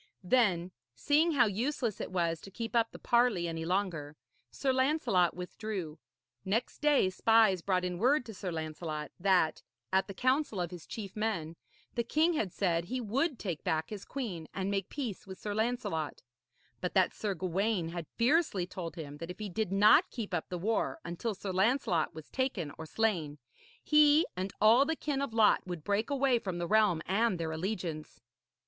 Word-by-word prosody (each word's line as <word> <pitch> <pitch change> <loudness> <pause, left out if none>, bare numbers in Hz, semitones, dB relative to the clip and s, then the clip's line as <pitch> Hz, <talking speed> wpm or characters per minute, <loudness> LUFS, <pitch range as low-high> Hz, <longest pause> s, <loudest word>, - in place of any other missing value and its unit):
Then, 185 -5 +2 0.2
seeing 310 +3 +3
how 250 -4 +5
useless 230 +2 -1
it - - -4
was 170 -3 0
to - - -10
keep 225 +4 -5
up 230 -1 +3
the - - -10
parley 235 -8 +2
any 165 -1 -4
longer, 170 -5 -1 0.3
Sir 270 -2 0
Lancelot 260 - +2
withdrew. 180 -3 -5 0.4
Next 225 +6 -1
day 290 -10 +3
spies 220 -2 +4
brought 185 0 0
in 180 -1 -3
word 255 +4 +3
to 225 - -8
Sir 185 -2 -5
Lancelot 155 -2 -5
that, 180 -4 +2 0.3
at 190 +2 +2
a - - -5
council 255 -2 +1
of 175 -1 -2
his 175 -3 -10
chief 200 -4 -7
men, 195 -7 -2 0.4
the 235 - 0
king 315 +8 +2
had 210 - -1
said 170 -3 0
he 255 +7 -3
would 255 +6 0
take 175 -9 -4
back 160 +2 -1
his 205 -2 -6
queen 200 - -5
and 195 0 -1
make 195 -2 -2
peace 240 -10 -5
with 190 -1 -8
Sir 210 - -4
Lancelot; 220 -9 -2 0.6
but - - -3
that - - +4
Sir 205 -3 -2
Gawaine 185 +1 -1
had 170 -2 -6
fiercely 240 - +2
told 180 -2 -6
him 145 -4 -7
that 165 +3 -7
if 180 - -7
he 215 -1 -5
did 210 +1 -2
not 200 +2 +6
keep 225 -6 -6
up 175 - -2
the 180 - -3
war 220 - -1
until 200 +6 -3
Sir 190 +1 -5
Lancelot 190 - +1
was 160 -1 -9
taken 240 - -1
or 160 - -8
slain, 170 -9 0 0.5
he 300 +1 +5
and 185 +1 -3
all 225 +5 +6
the 320 +3 -1
kin 290 -3 -2
of 280 - -2
Lot 220 -2 +4
would 175 -4 -5
break 205 - 0
away 270 -3 +2
from 185 -5 -4
the 175 - -2
realm 205 -4 +3
and 200 0 +1
their 160 -1 -2
allegiance. 165 -3 -4
195 Hz, 185 wpm, -31 LUFS, 175-235 Hz, 0.6 s, not